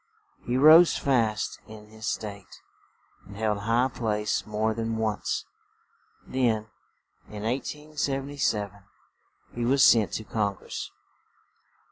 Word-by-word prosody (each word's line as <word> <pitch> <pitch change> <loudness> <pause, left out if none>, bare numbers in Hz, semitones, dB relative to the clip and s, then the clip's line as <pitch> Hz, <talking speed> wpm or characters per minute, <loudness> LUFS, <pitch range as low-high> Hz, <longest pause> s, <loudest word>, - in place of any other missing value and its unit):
He 120 +1 +1
rose 160 +5 +7
fast 115 -6 0
in 105 -1 -12
his 110 0 -8
state, 100 -3 -5 0.7
and 100 0 -11
held 105 -1 0
high 115 +5 +2
place 105 -5 -2
more 110 +1 0
than 115 0 -3
once; 110 -2 -2 0.8
then, 110 -4 0 0.6
in 105 -1 -7
1877, 135 -5 -2 0.7
he 120 - -3
was 130 +2 +4
sent 110 -4 +5
to 110 - -3
Congress. 100 -3 -3
110 Hz, 105 wpm, -27 LUFS, 105-130 Hz, 0.8 s, rose